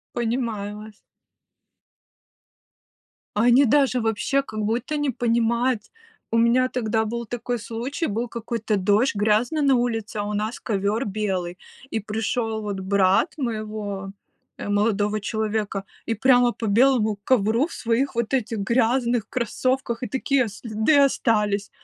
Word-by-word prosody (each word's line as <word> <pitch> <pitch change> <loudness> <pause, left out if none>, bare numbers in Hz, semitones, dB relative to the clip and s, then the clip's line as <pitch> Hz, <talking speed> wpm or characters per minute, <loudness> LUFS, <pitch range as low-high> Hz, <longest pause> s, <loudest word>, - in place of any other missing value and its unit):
Понимаю 225 -4 -2
вас. 215 0 -10 2.5
Они 245 +5 +5
даже 270 0 +3
вообще, 225 +5 +1
как 215 -5 -7
будто 235 +8 -1
не 290 -2 0
понимают. 235 0 +1 0.5
У 230 - +2
меня 245 +2 +3
тогда 220 -3 0
был 235 +1 -4
такой 245 +1 -3
случай, 245 +9 -3
был 230 +4 -2
какой-то 230 -2 -2
дождь 205 +7 +2
грязный 220 +8 +1
на 275 -2 +4
улице, 230 -3 -1
а 205 - -1
у 210 +1 -3
нас 215 +3 -2
ковер 210 +2 -1
белый. 190 -4 -2 0.3
И 225 - 0
пришел, 220 +1 -2
вот, 200 -2 -3
брат 190 - +2
моего, 215 -5 -4 0.5
э, - - -6
молодого 205 0 +1
человека, 215 -2 -2 0.2
и 230 - 0
прямо 245 +1 +4
по 235 - -6
белому 220 -1 +3
ковру 230 +3 +2
в - - -11
своих 235 +4 -1
вот 235 +1 -1
этих 235 -3 0
грязных 235 +2 +1
кроссовках, 255 0 -1
и 250 - -2
такие 265 -1 +1
следы 220 +6 0
остались. 210 -7 +2
225 Hz, 135 wpm, -23 LUFS, 210-245 Hz, 2.5 s, Они